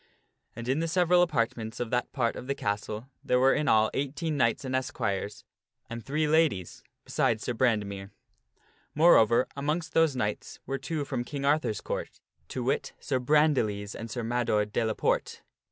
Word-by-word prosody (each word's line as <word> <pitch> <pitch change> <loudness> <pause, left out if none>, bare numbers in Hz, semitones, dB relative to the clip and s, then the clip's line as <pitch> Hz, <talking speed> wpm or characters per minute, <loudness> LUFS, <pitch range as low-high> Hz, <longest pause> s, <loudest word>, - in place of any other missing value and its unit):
And 115 +1 -7
in 135 +4 +1
the 165 - 0
several 175 +1 +4
apartments 115 -8 -1
of 120 -2 -3
that 125 0 0
part 120 -4 0
of 125 - -8
the 140 - -1
castle, 105 0 -3 0.2
there 125 - +2
were 135 +1 +5
in 150 - 0
all 110 0 +4
eighteen 145 +3 -2
knights 125 -1 +1
and 130 0 -2
esquires, 105 -6 -2 0.5
and 115 0 -5
three 150 +5 0
ladies 150 - +1 0.2
besides 110 -1 0
Sir 125 - -2
Brande 115 -3 +2
mere. 100 -1 -7 0.9
Moreover, 130 -7 +6
amongst 155 +4 -2
those 165 -4 +3
knights 105 -4 -3
were 135 0 -3
two 155 -4 -3
from 130 -3 -2
King 140 +2 -5
Arthur's 145 -7 +1
Court: - - -5 0.3
to 125 - -4
wit, 130 - -1
Sir 130 -2 -1
Brandiles 125 -8 +2
and 115 - -7
Sir 120 0 -4
Mador 115 -3 +1
de 105 +2 -1
la 110 -1 -1
Porte. - - -1
125 Hz, 175 wpm, -28 LUFS, 110-150 Hz, 0.9 s, Moreover